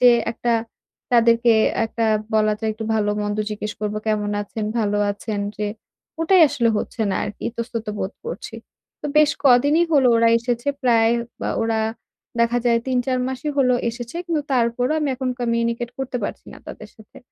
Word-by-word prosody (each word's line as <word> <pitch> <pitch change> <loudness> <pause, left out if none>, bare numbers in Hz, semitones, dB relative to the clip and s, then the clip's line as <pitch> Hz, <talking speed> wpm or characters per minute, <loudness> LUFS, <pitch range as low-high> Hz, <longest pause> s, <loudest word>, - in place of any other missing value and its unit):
যে 250 -1 +8 0.2
একটা 240 +1 -1 0.6
তাদেরকে 235 0 +5 0.3
একটা 225 0 -1 0.3
বলা 215 0 +3
যায় 220 -1 0
একটু 220 +1 -6
ভালো-মন্দ 210 -1 0
জিজ্ঞেস 210 0 -4
করব, 210 0 -2
"কেমন 210 -1 0
আছেন? 210 +1 -5
ভালো 205 -2 +1
আছেন?" 205 0 -4 0.2
যে 210 - -2 0.5
ওটাই 355 +2 +5
আসলে 235 -3 +1
হচ্ছে 225 - -4
না - - 0
আরকি। 210 0 -8
ইতস্তত 230 -1 -5
বোধ 190 - -3
করছি। 475 - -6 0.5
তো - - -4
বেশ 305 -1 +5
কদিনই 285 +6 +5
হলো 270 -4 +5
ওরা 230 0 +4
এসেছে। 240 +3 -2
প্রায় 230 -2 +4 0.4
আ - - 0
ওরা 225 -1 0 0.6
দেখা 235 +1 +2
যায় 235 -1 +4
৩-৪ 255 0 0
মাসই 265 +3 -3
হল 255 -2 +4 0.2
এসেছে। 240 +4 -8
কিন্তু 325 -3 0
তারপরও 245 +2 +1
আমি 295 - 0
এখন 260 0 -3
communicate 235 0 -1
করতে 265 -1 -3
পারছি - - -6
না - - -12
তাদের 215 - -9
সাথে। 220 -2 -16
235 Hz, 165 wpm, -22 LUFS, 220-250 Hz, 0.6 s, যে